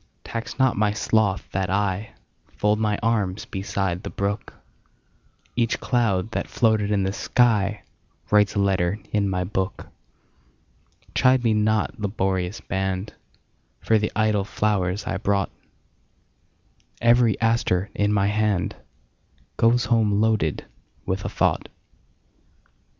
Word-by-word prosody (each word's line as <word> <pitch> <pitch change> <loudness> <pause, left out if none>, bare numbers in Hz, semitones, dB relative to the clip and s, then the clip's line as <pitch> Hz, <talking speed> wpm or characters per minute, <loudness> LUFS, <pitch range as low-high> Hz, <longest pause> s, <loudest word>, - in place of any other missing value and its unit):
Tax 115 0 -6
not 130 -2 +3
my 105 0 +1
sloth 105 -4 +1
that 95 -1 -1
IFold 105 +1 -2
my 105 -2 +1
arms 105 -4 0
beside 95 -2 -2
the - - -6
brook; 100 +1 -3 1.0
Each 115 -1 0
cloud 110 -5 0
that - - -2
floated 110 -3 +1
in 100 -2 +1
the 95 - 0
skyWrites 105 -2 0
a - - +1
letter 95 -1 +1
in 100 -2 +1
my 90 -1 -1
book. 95 +1 -3 1.3
Chide 130 -1 +4
me 115 -2 +3
not, 110 +2 +1
laborious 95 -2 -1
band, 95 +1 -3 0.7
For 110 - +2
the 105 - -1
idle 110 -2 +2
flowers 100 -1 -1
I - - -2
brought; 100 -1 0 1.5
Every 120 -1 +4
aster 115 -5 +1
in 105 0 +1
my 100 -1 +2
handGoes 105 +3 -2
home 110 -3 +2
loaded 110 -9 +1 0.4
with 95 +1 -2
a - - -1
thought. - - 0
105 Hz, 115 wpm, -24 LUFS, 95-110 Hz, 1.5 s, Chide